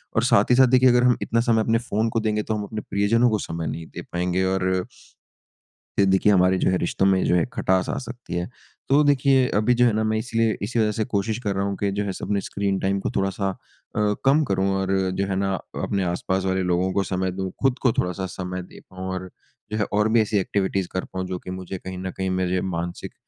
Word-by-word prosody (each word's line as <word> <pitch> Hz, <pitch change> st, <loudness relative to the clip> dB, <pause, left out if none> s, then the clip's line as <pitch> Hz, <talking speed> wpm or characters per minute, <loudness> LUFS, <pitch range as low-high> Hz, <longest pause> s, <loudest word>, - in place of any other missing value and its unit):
और -, -, +3 dB
साथ -, -, +3 dB
ही -, -, +6 dB
साथ 130 Hz, 0 st, +6 dB
देखिए 130 Hz, +1 st, +5 dB
अगर 125 Hz, 0 st, +4 dB
हम 125 Hz, -1 st, +4 dB
इतना 115 Hz, -, 0 dB
समय 110 Hz, -1 st, +4 dB
अपने 115 Hz, +1 st, +2 dB
फ़ोन 110 Hz, +3 st, +1 dB
को 115 Hz, -, 0 dB
देंगे 105 Hz, -1 st, 0 dB
तो 110 Hz, -, -2 dB
हम 105 Hz, -, -3 dB
अपने 105 Hz, +1 st, -5 dB
प्रियजनों 115 Hz, +5 st, +3 dB
को 110 Hz, -2 st, 0 dB
समय 85 Hz, -1 st, -4 dB
नहीं 80 Hz, 0 st, -5 dB
दे -, -, -4 dB
पाएँगे 90 Hz, +1 st, 0 dB
और 95 Hz, -1 st, 0 dB, 1.1 s
ये 100 Hz, -, +6 dB
देखिए 95 Hz, +2 st, +4 dB
हमारे 95 Hz, -1 st, +4 dB
जो -, -, +2 dB
है 95 Hz, -, +2 dB
रिश्तो 90 Hz, +2 st, 0 dB
में 95 Hz, -1 st, +3 dB
जो 90 Hz, -, +3 dB
है 85 Hz, -, +3 dB
खटास 95 Hz, 0 st, +1 dB
आ -, -, -2 dB
सकती 120 Hz, -8 st, -7 dB
है। 85 Hz, 0 st, -2 dB, 0.4 s
तो 145 Hz, +2 st, +5 dB
देखिए 135 Hz, -2 st, +3 dB
अभी 110 Hz, +4 st, +3 dB
जो 125 Hz, 0 st, +4 dB
है 115 Hz, -, +3 dB
ना, 110 Hz, +1 st, 0 dB
मैं 110 Hz, 0 st, +1 dB
इसलिए 115 Hz, -1 st, 0 dB
इसी 115 Hz, +3 st, -1 dB
वज़ह 105 Hz, -1 st, +2 dB
से 110 Hz, +1 st, -1 dB
कोशिश 105 Hz, +2 st, 0 dB
कर 100 Hz, -2 st, -1 dB
रहा 95 Hz, -, 0 dB
हूँ 100 Hz, -, -2 dB
कि 100 Hz, -1 st, 0 dB
जो 100 Hz, +1 st, -1 dB
है 100 Hz, -, -2 dB
सब -, -, -6 dB
अपने 100 Hz, -1 st, 0 dB
स्क्रीन 100 Hz, -1 st, -2 dB
टाइम 100 Hz, +1 st, 0 dB
को -, -, -2 dB
थोड़ा-सा 95 Hz, 0 st, 0 dB
अ, 105 Hz, +2 st, -3 dB
कम 145 Hz, +3 st, +5 dB
करूँ 95 Hz, -2 st, 0 dB
और 95 Hz, -, -2 dB, 0.3 s
जो 100 Hz, -, 0 dB
है 95 Hz, -, -1 dB
ना, 95 Hz, 0 st, 0 dB
अ, -, -, -9 dB
अपने 100 Hz, -1 st, 0 dB
आसपास 95 Hz, +2 st, -1 dB
वाले 95 Hz, 0 st, +1 dB
लोगों 90 Hz, +1 st, +1 dB
को 100 Hz, -, +1 dB
समय 95 Hz, -1 st, -1 dB
दो 95 Hz, -1 st, -2 dB
खुद 135 Hz, -1 st, +2 dB
को 125 Hz, -, +4 dB
थोड़ा-सा 90 Hz, +1 st, -1 dB
समय 90 Hz, 0 st, -4 dB
दे -, -, -14 dB
पाऊँ। 95 Hz, 0 st, -7 dB
और 95 Hz, 0 st, -5 dB, 0.4 s
जो 105 Hz, -1 st, 0 dB
और 105 Hz, +1 st, +3 dB
भी 115 Hz, 0 st, +5 dB
ऐसी 105 Hz, -1 st, 0 dB
एक्टिविटी 95 Hz, 0 st, 0 dB
कर 95 Hz, -, -3 dB
पाऊँ 95 Hz, 0 st, -3 dB
जो 90 Hz, 0 st, -3 dB
की 90 Hz, -, -8 dB
मुझे 95 Hz, 0 st, -6 dB
कहीं 95 Hz, 0 st, -7 dB
न 95 Hz, 0 st, -4 dB
कहीं 95 Hz, 0 st, -1 dB
मेरे 95 Hz, 0 st, 0 dB
मानसिक 85 Hz, -1 st, -4 dB
100 Hz, 250 wpm, -23 LUFS, 95-110 Hz, 1.1 s, ही